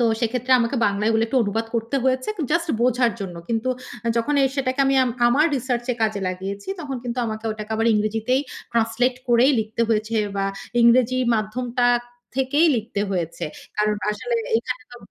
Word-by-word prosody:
তো - - +4 0.2
সেক্ষেত্রে 250 +2 0
আমাকে 235 +3 0
বাংলায় 205 +2 0
এগুলো 225 0 +2
একটু 230 - -2
অনুবাদ 225 +2 -1
করতে 230 +4 -1
হয়েছে, 260 0 +1 0.2
জাস্ট 340 0 +1
বোঝার 245 -1 +3
জন্য। 180 -3 -5
কিন্তু 230 +2 -1 0.4
আ - - +2
যখন 235 +6 +1
এ - - +5
সেটাকে 260 0 0
আমি 270 - +3
আম 250 - -1 0.2
আমার 290 +6 +4
রিসার্চ 245 -1 -2
এ - - -4
কাজে 215 -2 0
লাগিয়েছি 195 +2 -5
তখন 275 -4 -4
কিন্তু 240 0 -3
আমাকে 220 0 -5
ওটাকে 215 0 -6
আবার 225 +1 +1
ইংরেজিতেই 220 +5 +1 0.3
ট্রান্সলেট 230 +2 +1
করেই 240 +4 +5
লিখতে 220 +2 -5
হয়েছে 220 0 0 0.2
বা 195 - 0 0.4
ইংরেজি 250 +2 +4 0.2
মাধ্যমটা 240 +3 -1 0.5
থেকেই 285 +5 +3
লিখতে 220 -2 -3
হয়েছে। 170 -4 -2 0.3
কারণ 210 0 +2 0.2
আসলে 470 - -2 0.2
এখানে 255 - -3
তো - - -9
235 Hz, 175 wpm, -23 LUFS, 215-255 Hz, 0.5 s, এ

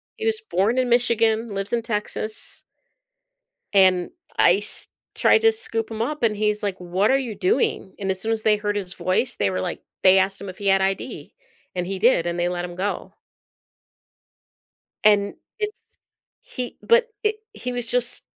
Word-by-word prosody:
He 445 - -5
was 445 -1 +1
born 235 - 0
in 255 -1 +2
Michigan, 230 -2 +2
lives 195 +2 -3
in 235 - +2
Texas 215 -1 -3 1.1
and 185 -2 +4 0.3
ICE 195 +4 +3 0.3
tried - - +5
to 450 0 +6
scoop 225 - -3
him 220 -1 -4
up, 295 +3 -2
and 220 -2 +3
he's, 210 0 0
like, 200 -3 -2
"What 180 +3 0
are 270 - +4
you 255 -5 -3
doing?" 395 - 0
and 195 -1 -1
as 190 0 -3
soon 225 - -1
as 220 -1 -1
they 215 -1 +4
heard 205 0 -2
his 190 -3 -3
voice, 240 +7 0
they 100 - +1
were, 95 -1 -2
like - - -4 0.2
they 190 0 +7
asked 195 +1 +1
him 200 - -7
if 185 - -10
he 200 - -3
had 195 0 +4
ID, 195 - -3 0.4
and 180 -1 -2
he 195 0 -3
did, 210 -6 +4
and 175 0 -2
they 175 - +1
let 175 0 -2
him 175 -1 -8
go. 195 +3 -3 1.9
And 205 -1 +4 0.2
it's 425 0 -6 0.4
he 250 -1 -6
but 470 0 +4
it 425 0 +1 0.2
he 250 - -5
was 245 -1 -3
just 245 -1 0
210 Hz, 185 wpm, -23 LUFS, 190-245 Hz, 1.9 s, they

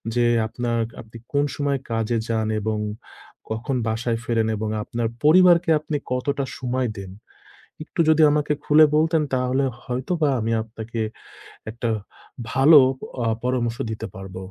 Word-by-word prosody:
যে, 120 - +3 0.2
আপনার 120 0 -2 0.2
আপনি 115 +1 -13 0.2
কোন 145 0 +2
সময় 140 -2 -1
কাজে 115 +1 0
যান 110 -1 0
এবং 110 0 -1 0.7
কখন 115 +5 -2
বাসায় 115 +1 -1
ফেরেন, 115 -2 +1
এবং 110 0 -3
আপনার 115 +1 -2 0.2
পরিবারকে 175 +2 +6
আপনি 150 -1 -3
কতটা 140 +2 -1
সময় 125 -1 -1
দেন? 95 -1 -7 0.7
একটু 170 - -4
যদি 160 0 +4
আমাকে 150 0 +1
খুলে 155 +1 +6
বলতেন, 160 0 +2
তাহলে 130 +2 +1 0.2
হয়তোবা 145 +5 -1
আমি 115 +1 -1
আপনাকে 115 +1 -7 0.7
একটা 115 +1 -4 0.6
ভালো 145 +4 +7 0.4
অ্যা 115 -2 0
পরামর্শ 120 -2 0 0.2
দিতে 110 - -5
পারব। 95 -1 -9
125 Hz, 135 wpm, -23 LUFS, 115-145 Hz, 0.7 s, ভালো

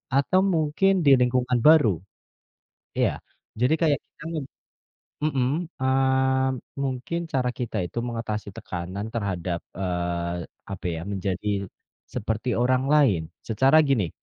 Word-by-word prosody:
atau 140 +7 +3 0.2
mungkin 160 +5 +2
di - - +6
lingkungan 125 0 +2
baru. 155 -7 +7 1.1
Iya. - - +4 0.5
Jadi 125 +5 +4
kayak 150 -3 +3
kita - - -15
me - - -1 0.9
mhm, 135 -5 +1 0.3
eee, 130 0 +2 0.3
mungkin 130 +5 -2
cara 130 -2 +1
kita 120 -3 -3
itu 90 - -10
mengatasi 115 -3 -4
tekanan 90 +3 -5
terhadap, 95 -6 -2 0.2
eee, 85 -2 -2 0.3
apa 95 -2 -7
ya, - - -4
menjadi 95 0 -3 0.7
seperti 110 +3 -2
orang 130 +1 +3
lain. 130 - +4 0.3
Secara 135 +7 +4
gini 110 -11 +2
125 Hz, 120 wpm, -25 LUFS, 100-135 Hz, 1.1 s, baru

